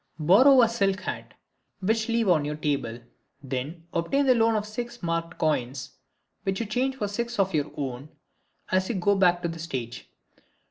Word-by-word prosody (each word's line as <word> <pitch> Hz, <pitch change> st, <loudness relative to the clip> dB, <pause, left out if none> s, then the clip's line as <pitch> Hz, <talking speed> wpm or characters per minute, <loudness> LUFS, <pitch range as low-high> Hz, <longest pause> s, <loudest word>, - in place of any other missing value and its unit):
Borrow 240 Hz, -, +6 dB
a -, -, +5 dB
silk 200 Hz, -4 st, 0 dB
hat, -, -, -6 dB, 0.4 s
which 220 Hz, +3 st, 0 dB
leave 230 Hz, -1 st, +1 dB
on 165 Hz, -5 st, +4 dB
your 150 Hz, +1 st, -3 dB
table. 140 Hz, -6 st, -2 dB, 0.4 s
Then 140 Hz, +6 st, -5 dB
obtain 275 Hz, +13 st, +1 dB
the 260 Hz, -, +6 dB
loan 225 Hz, -1 st, +3 dB
of 210 Hz, -1 st, -1 dB
six 240 Hz, +1 st, -6 dB
marked 165 Hz, 0 st, -2 dB
coins, 135 Hz, -4 st, -1 dB, 0.5 s
which 195 Hz, 0 st, -2 dB
you 230 Hz, -, -1 dB
change 255 Hz, +5 st, -1 dB
for 210 Hz, -6 st, -2 dB
six 235 Hz, +4 st, -3 dB
of 195 Hz, -1 st, +1 dB
your 150 Hz, -1 st, 0 dB
own, 135 Hz, 0 st, -5 dB, 0.6 s
as 185 Hz, 0 st, +1 dB
you 235 Hz, -, -1 dB
go 200 Hz, +2 st, +2 dB
back 180 Hz, -2 st, +3 dB
to -, -, +1 dB
the 165 Hz, 0 st, -6 dB
stage. 130 Hz, -8 st, -6 dB
185 Hz, 180 wpm, -26 LUFS, 150-225 Hz, 0.6 s, Borrow